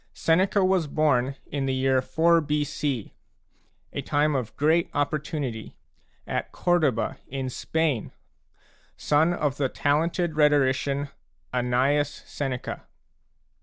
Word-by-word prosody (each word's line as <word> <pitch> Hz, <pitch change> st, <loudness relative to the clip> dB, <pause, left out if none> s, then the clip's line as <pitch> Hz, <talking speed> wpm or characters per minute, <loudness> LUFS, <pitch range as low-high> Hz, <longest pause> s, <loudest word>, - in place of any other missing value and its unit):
Seneca 190 Hz, +4 st, +2 dB
was 185 Hz, -4 st, +2 dB
born 140 Hz, -3 st, +1 dB
in 135 Hz, -1 st, -3 dB
the 130 Hz, -, 0 dB
year 130 Hz, 0 st, +2 dB
4 165 Hz, +5 st, +3 dB
b.c, 145 Hz, -5 st, -2 dB, 0.8 s
a -, -, -2 dB
time 150 Hz, +1 st, +1 dB
of 125 Hz, -5 st, -3 dB
great 160 Hz, +3 st, +2 dB
opportunity, 145 Hz, -5 st, -3 dB, 0.5 s
at -, -, -3 dB
Corduba, 155 Hz, -10 st, +1 dB
in 130 Hz, -1 st, -4 dB
Spain, 155 Hz, -4 st, -1 dB, 0.9 s
son 155 Hz, +3 st, +2 dB
of 150 Hz, -5 st, -1 dB
the 135 Hz, -2 st, 0 dB
talented 160 Hz, +4 st, 0 dB
rhetorician, 140 Hz, -1 st, +2 dB, 0.4 s
Annaeus 130 Hz, +4 st, +1 dB
Seneca. 135 Hz, -3 st, -5 dB
145 Hz, 105 wpm, -26 LUFS, 135-155 Hz, 0.9 s, 4